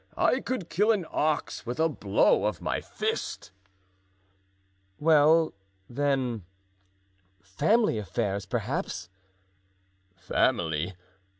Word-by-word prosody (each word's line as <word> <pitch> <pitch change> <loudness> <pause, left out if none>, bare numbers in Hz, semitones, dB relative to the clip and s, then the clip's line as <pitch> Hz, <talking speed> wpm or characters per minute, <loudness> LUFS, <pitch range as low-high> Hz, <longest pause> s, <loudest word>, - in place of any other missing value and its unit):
I 255 - +3
could 255 -10 -4
kill 210 +5 +3
an 200 -6 0
ox 155 0 -1
with 120 +5 -4
a 160 - +4
blow 105 -10 +2
of - - -1
my - - -2
fist." - - -4 1.5
"Well, 160 +1 +4 0.3
then, 130 -5 -1 1.0
family 115 - +2
affairs, 100 0 -2
perhaps?" 90 -1 -3 1.1
"Family! 85 -1 0
135 Hz, 90 wpm, -28 LUFS, 95-165 Hz, 1.5 s, a